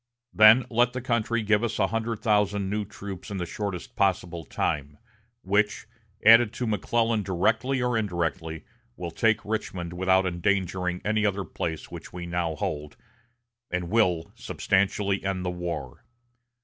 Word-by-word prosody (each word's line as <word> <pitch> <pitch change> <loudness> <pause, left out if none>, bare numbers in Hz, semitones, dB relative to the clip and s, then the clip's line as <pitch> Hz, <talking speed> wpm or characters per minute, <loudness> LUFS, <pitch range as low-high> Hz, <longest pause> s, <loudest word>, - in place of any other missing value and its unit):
Then 110 +3 +7
let 120 +1 +3
the 130 - -3
country 115 -1 0
give 105 +1 +2
us 115 -1 -1
a 100 - +3
hundred 115 +2 -2
thousand 105 -3 +1
new 105 0 -1
troops 100 -3 -8
in 100 - -4
the 90 - -2
shortest 95 0 -5
possible 90 -4 0
time, 75 0 -2 0.5
which, 105 +3 +1 0.4
added 115 0 +7
to 125 - -3
McClellan 115 +1 +1
directly 110 +8 +1
or 125 -1 +1
indirectly, 85 -6 -2 0.3
will 85 -4 -5
take 110 +6 +1
Richmond 95 -5 -3
without 95 +1 +2
endangering 90 0 -1
any 105 +1 +1
other 100 -1 0
place 80 0 -5
which - - -9
we 90 -1 -6
now 85 -2 -2
hold, 75 0 -4 0.7
and 90 0 -3
will 90 -7 +2
substantially 100 0 0
end 95 -1 -2
the 90 - 0
war. 85 -7 -5
100 Hz, 150 wpm, -26 LUFS, 90-110 Hz, 0.7 s, Then